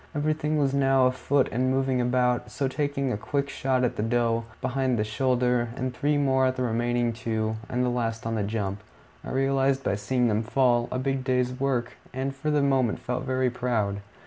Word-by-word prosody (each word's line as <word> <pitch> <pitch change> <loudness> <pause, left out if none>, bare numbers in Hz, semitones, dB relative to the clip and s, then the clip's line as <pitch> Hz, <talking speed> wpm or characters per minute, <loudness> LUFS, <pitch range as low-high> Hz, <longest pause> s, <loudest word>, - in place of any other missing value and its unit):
Everything 155 +1 0
was 140 -2 +1
now 135 -1 +4
afoot 130 +2 +2
and 130 +2 +1
moving 130 -1 +1
about, 125 0 +1
so 140 - -1
taking 140 -1 -1
a 105 - -1
quick 140 +5 -2
shot 130 -1 0
at 125 - 0
the - - 0
doe, 115 0 +1
behind 130 -1 0
the 105 - +1
shoulder, 125 +1 +1
and 130 -1 -3
three 145 +1 +1
more 130 -2 +3
at 130 - -1
the 130 - -2
remaining 120 0 0
two, 110 -1 -2
the - - -5
last 115 -2 -2
on 115 - -1
the 110 - 0
jump, 100 -1 -2 0.4
I - - -7
realized, 135 0 +1
by 125 - 0
seeing 120 +5 0
them 110 -1 +1
fall, 120 0 +2
a - - -1
big 135 0 -1
day's 125 -1 +1
work, 130 -3 -1 0.2
and 135 +1 -2
for 150 +3 -3
the 150 -1 +2
moment 130 -5 +2
felt 125 +2 -4
very 130 -1 +1
proud. 110 -5 -1
125 Hz, 200 wpm, -26 LUFS, 120-135 Hz, 0.4 s, now